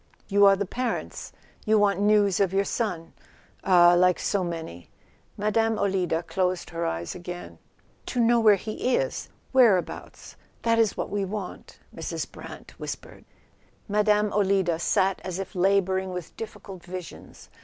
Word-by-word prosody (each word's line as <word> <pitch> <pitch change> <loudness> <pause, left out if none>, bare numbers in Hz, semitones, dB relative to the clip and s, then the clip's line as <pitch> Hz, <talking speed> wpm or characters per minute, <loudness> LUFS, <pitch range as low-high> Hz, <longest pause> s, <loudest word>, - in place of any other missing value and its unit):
"You 200 0 +6
are 195 - +6
the 200 +1 -2
parents? 245 +4 -4 0.3
You 215 0 +3
want 200 -2 +2
news 205 -2 +3
of 195 -3 +2
your 195 +1 +2
son 180 -7 -3 0.5
—ah, 175 -2 +6
like 180 0 +4
so 200 -2 -1
many 160 - -6 0.3
!" - - -36
Mme. 225 +2 +1
Olida 180 -4 0
closed 185 -1 -1
her 170 0 -2
eyes 85 +1 -3
again. 175 0 -8 0.5
"To 250 - -2
know 235 0 +4
where 215 -2 +6
he 215 +5 -1
is—whereabouts—that 230 - -1
is 220 -3 +2
what - - -3
we 205 -1 -1
want," 195 0 -6 0.2
Mrs. - - -5
Brant - - -11
whispered. - - -8 0.6
Mme. 210 0 +2
Olida 190 -4 +2
sat 190 +2 +1
as 185 -1 -4
if 195 -1 -6
labouring 190 0 +1
with 180 -2 -7
difficult 195 -4 -9
visions. 180 -1 -10
195 Hz, 145 wpm, -26 LUFS, 180-210 Hz, 0.6 s, You